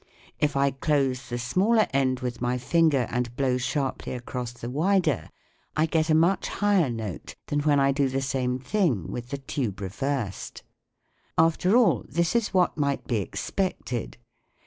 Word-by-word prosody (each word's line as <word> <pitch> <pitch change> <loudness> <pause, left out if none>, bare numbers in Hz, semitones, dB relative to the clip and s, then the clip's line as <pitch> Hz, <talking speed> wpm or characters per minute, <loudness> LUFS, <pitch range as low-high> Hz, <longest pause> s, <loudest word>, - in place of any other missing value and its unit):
If 150 -1 +1
I 140 0 +3
close 135 -2 0
the 120 - -2
smaller 190 - +2
end 130 -1 +1
with 125 -1 -4
my 125 +1 0
finger 145 0 +2
and 120 0 -2
blow 130 -2 +1
sharply 135 0 -2
across 125 -1 -5
the 120 -1 -8
wider, 155 - +1 0.5
I 155 - +4
get 160 0 0
a 155 - +5
much 170 +5 +3
higher 200 -7 +2
note 110 -7 -5
than 145 - -1
when 145 -1 +3
I 140 0 +4
do 135 -1 +1
the 135 +1 -1
same 125 -2 -1
thing 130 - 0
with 120 +2 -6
the 140 - -3
tube 130 -7 -3
reversed. 110 +2 -3 0.7
After 165 +6 +4
all, 245 -3 +4
this 170 +4 0
is 235 -2 +1
what 180 -4 +2
might 140 -1 0
be 120 - 0
expected. 125 - -3
135 Hz, 165 wpm, -26 LUFS, 125-160 Hz, 0.7 s, a